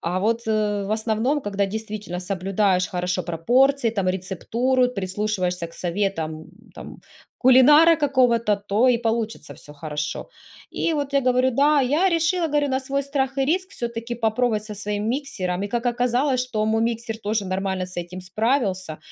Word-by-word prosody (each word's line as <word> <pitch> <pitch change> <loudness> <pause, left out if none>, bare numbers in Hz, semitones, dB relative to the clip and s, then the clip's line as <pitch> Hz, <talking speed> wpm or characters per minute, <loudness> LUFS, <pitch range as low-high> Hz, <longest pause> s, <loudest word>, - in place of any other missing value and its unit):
А 180 +2 -2
вот 230 +3 0
в 210 -2 0
основном, 225 +6 0
когда 200 -4 -1
действительно 210 -3 -5
соблюдаешь 190 0 0
хорошо 180 -1 -2
пропорции, 245 - +2
там 200 -4 -1
рецептуру, 230 +8 0
прислушиваешься 190 -4 -2
к 165 - -17
советам, 170 -4 -3 0.3
там, - - -10 0.4
кулинара 295 +6 +7
какого-то, 250 -7 +2
то 205 +4 +1
и 250 - +4
получится 225 -6 -3
всё 145 - -12
хорошо. 150 0 -5 0.4
И 335 - -1
вот 285 -2 -3
я 275 - +3
говорю: 255 0 +2
"Да". 285 +4 +3
Я 295 +9 +2
решила, 340 0 +1
говорю, 295 -2 0
на 265 0 0
свой 275 +1 -2
страх 270 -1 -2
и 270 - +3
риск 370 +6 0
всё-таки 235 -6 -5
попробовать 225 -1 0
со 215 -1 -7
своим 210 +1 -3
миксером. 200 -9 -2
И 205 - -3
как 235 +3 -2
оказалось, 250 +2 +1
что 215 -4 -1
мой 220 +1 +1
миксер 230 -1 -2
тоже 215 -1 -2
нормально 190 0 -2
с 185 - -8
этим 175 +2 -8
справился, 190 - -1
220 Hz, 160 wpm, -23 LUFS, 190-260 Hz, 0.4 s, кулинара